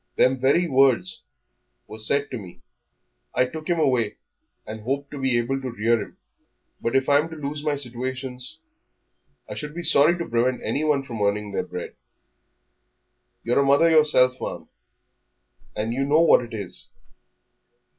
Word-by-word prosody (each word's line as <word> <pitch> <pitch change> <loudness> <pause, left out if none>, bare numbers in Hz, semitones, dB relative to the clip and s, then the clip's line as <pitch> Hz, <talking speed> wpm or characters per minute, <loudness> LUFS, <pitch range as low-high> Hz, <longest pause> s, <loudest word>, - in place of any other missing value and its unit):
Them 130 +1 +3
very 140 +7 +3
words 130 - +2 0.6
were 110 - -9
said 140 +6 0
to 125 - -4
me. 90 -4 -13 0.7
I 130 - +3
took 155 +4 -8
him 175 - +1
away 125 -8 +1 0.5
and 110 0 -7
hoped 140 +5 -3
to 145 - -7
be 130 -2 +2
able 135 +3 -1
to 130 - -4
rear 115 0 +1
him, - - -10 0.6
but 115 +3 -1
if 135 0 +2
I'm 145 +3 +3
to 160 - -8
lose 145 0 -5
my 150 -1 0
situations 130 +2 -6 0.4
" - - -47
"I - - -6
should 150 +1 -6
be 175 - -5
sorry 165 +2 +5
to 170 - -4
prevent 120 +2 0
anyone 150 -2 0
from 120 -5 -7
earning 100 0 0
their - - -1
bread 90 -1 -7 0.8
" - - -50
"You're 120 +3 +1
a - - +4
mother 140 +5 +4
yourself, 140 -5 +4
ma'am, - - -6 1.1
and 110 +2 -2
you 135 +3 -1
know 150 +4 +3
what 165 - +6
it 115 -1 -8
is." 95 -4 -6
130 Hz, 165 wpm, -24 LUFS, 115-145 Hz, 1.1 s, what